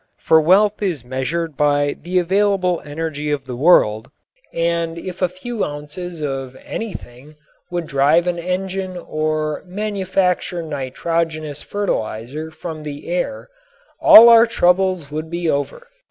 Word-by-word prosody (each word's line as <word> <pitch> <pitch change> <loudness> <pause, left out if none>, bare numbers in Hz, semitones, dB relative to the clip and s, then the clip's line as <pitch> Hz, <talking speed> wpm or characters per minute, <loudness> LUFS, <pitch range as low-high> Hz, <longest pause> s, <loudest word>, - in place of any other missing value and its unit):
For 160 0 +5
wealth 200 +6 +3
is 170 - -2
measured 140 +5 -3
by 145 0 +1
the 180 +3 -2
available 185 0 +1
energy 150 0 -4
of 145 -2 -2
the 125 -1 -6
world, 120 -6 +3 0.4
and 170 0 -1
if 180 +2 -7
a 180 - +2
few 210 +5 -5
ounces 150 +4 -6
of 135 -2 -4
anything 150 - -7 0.3
would 175 -1 -3
drive 150 +4 +3
an 175 -1 -1
engine 185 +1 -3
or 155 -2 -2
manufacture 190 -3 -1
nitrogenous 155 +1 -3
fertilizer 150 - -3
from 160 0 -8
the 150 +1 -8
air 225 +11 -3 0.5
all 230 +2 +10
our 230 0 +7
troubles 185 -6 +1
would 155 +1 -5
be 170 0 -3
over. 145 - -2
165 Hz, 130 wpm, -19 LUFS, 145-185 Hz, 0.5 s, all